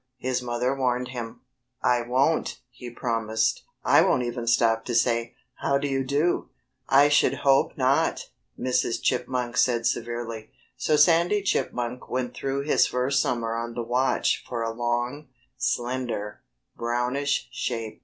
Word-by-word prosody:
his 125 0 -1
mother 125 +2 -1
warned 125 -1 0
him. 120 -3 -7 0.4
"I 125 -1 +3
won't!" 125 +1 +1
he 125 -1 -9
promised. 115 -2 -1 0.2
"I - - +5
won't 125 - +2
even 120 0 -4
stop 115 -1 +3
to 120 - -2
say, 115 0 +1 0.2
'How 140 - +1
do 140 +1 -2
you 135 -1 0
do!'" 145 +6 0 0.4
"I 140 +2 +6
should 145 0 +2
hope 135 0 +3
not!" - - +1 0.3
Mrs. 125 -2 0
Chipmunk 125 -1 -1
said 120 -2 +2
severely. 120 -2 -3 0.3
So 150 +4 +1
Sandy 170 +6 +4
Chipmunk 125 -9 -2
went 125 -1 -2
through 135 0 -2
his 150 - +3
first 125 +2 +1
summer 115 -2 -1
on 115 0 -4
the 120 - -2
watch 125 +3 +1
for 120 -2 -2
a 115 0 -2
long, 120 +5 -2 0.3
slender, 120 -4 -2 0.3
brownish 125 +4 -1
shape. 115 -3 -4
125 Hz, 145 wpm, -25 LUFS, 120-135 Hz, 0.4 s, I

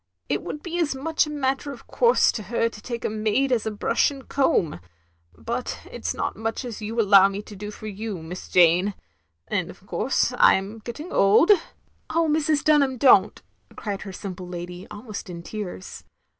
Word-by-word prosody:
" 90 - -50
It 145 - -1
would 300 - -7
be 345 0 -3
as 305 -5 0
much 310 +3 0
a - - -6
matter 280 -1 -1
of 275 - -11
course 475 0 +3
to 220 - -5
her 230 +3 0
to 215 - -12
take 235 +1 -5
a - - +3
maid 220 +5 0
as 230 -3 +1
a - - +2
brush 210 -1 +1
and 275 -2 -10
comb. 265 - +1 0.6
But 75 - -4
it - - -6
's - - -1
not - - -2
much 225 +4 -3
as 230 -3 -6
you 220 +2 -3
allow 200 -3 +7
me 200 +1 -5
to 210 - -11
do 210 +2 -6
for 210 - -10
you, 210 -4 -5
Miss 180 +3 -8
Jane; 180 +3 +4 0.5
and - - -1
of - - -13
course - - 0
I - - +7
*m 195 +4 -4
getting 300 +9 -7
old 210 - +5 0.2
— - - -38
" - - -41
"Oh 330 -1 +3
Mrs. 305 -1 +1
Dtmham, 280 -4 +3
don't," 215 -6 +5 0.3
cried 205 -2 -4
her 195 - -7
simple 185 -1 -7
lady, 175 +1 -7
almost 210 -1 -8
in 170 -1 -7
tears. 190 -2 -7
215 Hz, 205 wpm, -24 LUFS, 195-270 Hz, 0.6 s, allow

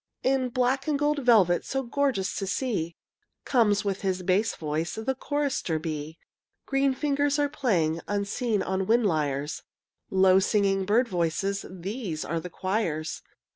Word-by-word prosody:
In 260 -1 +2
black 255 +3 0
and 300 -2 +2
gold 295 +1 +1
velvet, 215 -9 +4
So 270 0 -2
gorgeous 250 -6 0
to 195 - -3
see, 200 -6 -2 0.5
Comes 210 -5 +3
with 195 -1 -1
his 185 -2 -1
bass 195 +5 +1
voice 155 +1 -3
The 220 +5 -1
chorister 275 - -1
bee. 155 0 -5 0.5
Green 270 -1 +1
fingers 285 +1 +1
playing 165 - +1
Unseen 205 +2 -1
on 190 0 -1
wind 230 +1 +3
lyres, 150 -4 -1 0.5
Low 190 0 +5
singing 195 -1 +1
bird 230 +5 +3
voices, 185 +2 -1
These 185 -2 -5
are 165 -1 -2
his 180 - -8
choirs. 180 -6 -2
200 Hz, 140 wpm, -27 LUFS, 175-255 Hz, 0.5 s, Low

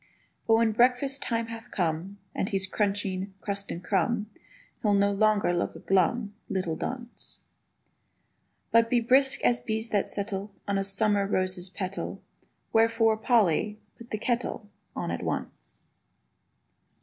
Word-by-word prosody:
But 225 - +6
when 225 0 +3
breakfast 255 +4 +3
time 230 -4 0
hath 225 0 -8
come, 175 +2 -2 0.2
And 195 - -1
he's 195 -1 0
crunching 195 -1 -1
crust 200 0 -3
and 175 - -5
crumb, 210 +3 0 0.5
He'll 205 -2 +3
no 200 0 +3
longer 205 -2 +2
look 175 - -1
a - - -8
glum 200 +3 +1 0.2
Little 185 -5 -1
dunce; 245 +3 -6 1.3
But 230 0 +5
be 245 - +3
brisk 260 +3 +3
as 120 0 +4
bees 220 - -3
that 205 -2 +1
settle 200 0 -3 0.2
On 200 -1 +1
a - - 0
summer 200 0 +1
rose's 185 -1 0
petal: 190 +1 -4 0.5
Wherefore, 225 0 +4
Polly, 215 -3 +2 0.2
put 235 0 -13
the 215 - -2
kettle 235 -2 -1 0.2
On - - -3
at - - -3
once. - - -5
205 Hz, 140 wpm, -28 LUFS, 195-230 Hz, 1.3 s, But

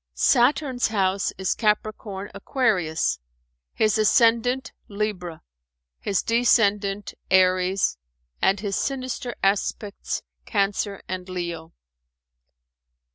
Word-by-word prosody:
Saturn's 260 0 +3
house 195 -2 0
is 190 -1 0
Capricorn 210 -2 -2
Aquarius, 195 - 0 0.5
his 215 0 +1
ascendant 235 +4 +3 0.2
Libra, 200 -5 -4 0.6
his 195 -2 -1
descendant 210 -4 +2 0.2
Aries 185 - +3 0.4
and 195 0 +2
his 200 -2 -2
sinister 255 -3 -3
aspects 200 +1 -1 0.2
Cancer 200 -1 -1
and 185 0 -5
Leo. 170 -2 -5
200 Hz, 80 wpm, -24 LUFS, 190-230 Hz, 0.6 s, Saturn's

